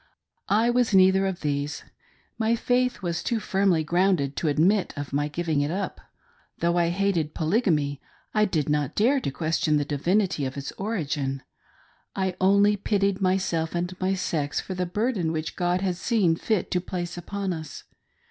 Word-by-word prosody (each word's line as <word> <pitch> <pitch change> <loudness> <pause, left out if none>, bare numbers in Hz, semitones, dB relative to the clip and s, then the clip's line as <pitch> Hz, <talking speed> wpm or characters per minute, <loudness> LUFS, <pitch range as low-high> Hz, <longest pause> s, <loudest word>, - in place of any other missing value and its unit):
I 225 +4 +3
was 240 -4 +2
neither 190 +1 +5
of 190 -2 -4
these. 145 0 -2 0.6
My 225 +1 +2
faith 245 -2 0
was 170 -1 -1
too 235 - -1
firmly 190 -6 +1
grounded 175 -4 +1
to 165 - -1
admit 180 +7 +2
of 145 -1 -5
my 145 +1 +1
giving 155 -1 -1
it 145 - 0
up. 190 +4 -3 0.6
Though 170 0 +1
I 170 -1 +2
hated 175 -4 0
Polygamy, 155 - +1 0.3
I 215 0 +4
did 160 -8 -1
not 150 -2 0
dare 255 +7 +3
to 240 - -2
question 155 +2 0
the 145 - 0
divinity 175 +4 0
of 130 +1 -4
its 140 - -5
origin. 145 - -3 0.7
I 190 -2 -1
only 200 +2 +4
pitied 200 -1 0
myself 180 -3 0
and 180 +1 -2
my 190 +1 +1
sex 150 -6 -1
for 190 - -5
the 180 -1 -2
burden 205 -3 -1
which 160 -1 -3
God 180 +1 0
had 185 -3 -1
seen 190 -5 +2
fit 210 +3 -1
to 180 - +1
place 175 -1 -4
upon 190 +2 -3
us. 155 -3 -8
180 Hz, 170 wpm, -25 LUFS, 155-200 Hz, 0.7 s, neither